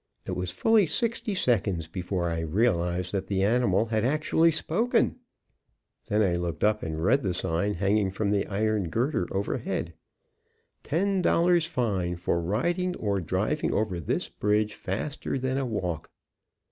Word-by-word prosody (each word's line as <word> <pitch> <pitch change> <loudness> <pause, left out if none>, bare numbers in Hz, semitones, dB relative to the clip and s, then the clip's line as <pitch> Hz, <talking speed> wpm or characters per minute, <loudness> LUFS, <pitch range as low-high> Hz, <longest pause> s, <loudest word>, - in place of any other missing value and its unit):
It - - -4
was 90 0 -2
fully 210 - +3
sixty 230 +1 -1
seconds 100 - +1
before 90 0 -2
I 80 - -2
realized 90 0 0
that 95 -2 -2
the 95 -1 0
animal 110 -2 +2
had 110 -1 -1
actually 155 +5 +3
spoken; 190 +13 +1 0.9
then 105 +1 +2
I 90 -3 +1
looked 85 -1 -3
up 105 0 +3
and 80 0 -4
read 130 +9 +3
the 95 -3 -1
sign 90 +4 0
hanging 100 +2 +1
from 100 +1 -1
the 100 -1 +1
iron 105 -2 0
girder 130 - 0
overhead, 100 +1 -2 0.9
"Ten 190 +4 0
dollars 170 -1 +3
fine 100 - -1
for 85 0 -1
riding 175 - 0
or 100 -3 -1
driving 95 - -1
over 105 -5 0
this 80 - -2
bridge 105 0 0
faster 120 +11 -3
than 130 +1 -1
a 135 - -1
walk." 90 -8 -3
105 Hz, 150 wpm, -27 LUFS, 90-135 Hz, 0.9 s, fully